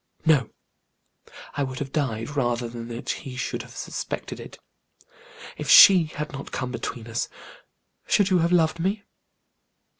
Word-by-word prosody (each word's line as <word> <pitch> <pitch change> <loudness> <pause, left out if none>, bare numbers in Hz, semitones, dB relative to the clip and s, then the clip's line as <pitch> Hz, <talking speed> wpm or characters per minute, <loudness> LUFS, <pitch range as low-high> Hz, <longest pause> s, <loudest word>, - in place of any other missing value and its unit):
No; 150 -7 +3 1.0
I 145 - -3
would 130 -2 -3
have 135 0 -5
died, 115 -6 -2
rather 120 -3 0
than 115 0 -8
that 120 0 -7
he 130 -2 -4
should - - -3
have - - -13
suspected - - -5
it. - - -10 1.0
If - - -5
she 185 -4 +9
had 150 0 -6
not 135 0 -7
come 125 -1 -3
between 120 -1 -5
us, 115 0 -3 0.8
should 200 -1 +3
you 185 - +4
have 170 +1 +1
loved 165 -2 +2
me?" 200 +4 -1
135 Hz, 150 wpm, -25 LUFS, 120-165 Hz, 1.0 s, she